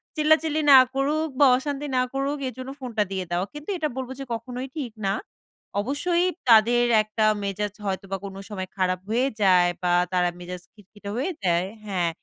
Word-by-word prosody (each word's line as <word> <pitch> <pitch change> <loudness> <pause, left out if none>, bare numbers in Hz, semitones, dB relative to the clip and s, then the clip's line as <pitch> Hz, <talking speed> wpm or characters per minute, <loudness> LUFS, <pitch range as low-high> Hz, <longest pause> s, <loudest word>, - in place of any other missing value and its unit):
চিল্লাচিল্লি 315 0 +3
না 270 - +11 0.2
করুক 300 +4 +1
বা 285 - +7
অশান্তি 285 +2 -4
না - - +4
করুক 275 +2 -1
এর 255 - -5
জন্য 260 0 -6
ফোনটা 240 -5 -1
দিয়ে 190 -1 -2
দাও। 175 +1 +1
কিন্তু 295 +3 -9
এটা 310 -3 0
বলবো 260 0 -4
যে, 275 - -4
কখনোই 250 +3 -5
ঠিক 250 -7 -4
না। 195 - +2 0.7
অবশ্যই 340 - 0 0.2
তাদের 235 +2 +6 0.2
একটা 215 +1 -1 0.2
মেজাজ 200 +1 -2
হয়তো 195 0 -2
বা 195 - 0
কোনো 195 0 -7
সময় 185 -3 -5
খারাপ 185 -1 +1
হয়ে 245 +4 +2
যায় 180 -3 +5
বা 180 - +2 0.2
তারা 180 -1 +2
মেজাজ 180 0 -7
খিটখিটে 205 0 -12
হয়ে 315 +9 -1
যায় 175 +1 +2 0.2
হ্যাঁ, 185 -4 0
225 Hz, 180 wpm, -25 LUFS, 190-275 Hz, 0.7 s, না